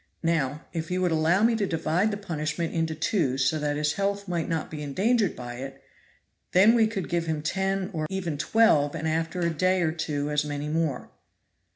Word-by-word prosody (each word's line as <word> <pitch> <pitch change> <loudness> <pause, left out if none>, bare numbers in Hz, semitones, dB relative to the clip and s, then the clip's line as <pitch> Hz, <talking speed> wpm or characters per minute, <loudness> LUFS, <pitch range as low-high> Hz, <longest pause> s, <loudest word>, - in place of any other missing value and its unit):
Now, 150 -3 0
if 165 -1 -3
you 180 0 -1
would 180 - +2
allow 165 +5 +3
me 230 0 +4
to 210 -3 0
divide 175 +4 +1
the 205 - -3
punishment 165 -3 -3
into 160 -1 -1
two 155 - 0
so 135 +4 +1
that 145 -1 -1
his 150 0 0
health 200 +2 -2
might 170 -3 -2
not 165 -1 -2
be 150 -1 -6
endangered 200 - +1
by 120 -1 -7
it, 135 +1 -7 0.7
then 200 +5 +7
we 225 -2 +4
could 205 -5 -4
give 170 -1 -1
him 155 -2 -2
ten 190 +3 -1
or 155 -2 -2
even 185 -5 -3
twelve, 155 -7 +3
and 160 0 -3
after 165 +3 -1
a 170 -1 +1
day 185 +3 +2
or 160 - +1
two 150 -2 -2
as 150 0 +1
many 145 0 -4
more." 160 -2 -1
165 Hz, 205 wpm, -26 LUFS, 150-190 Hz, 0.7 s, then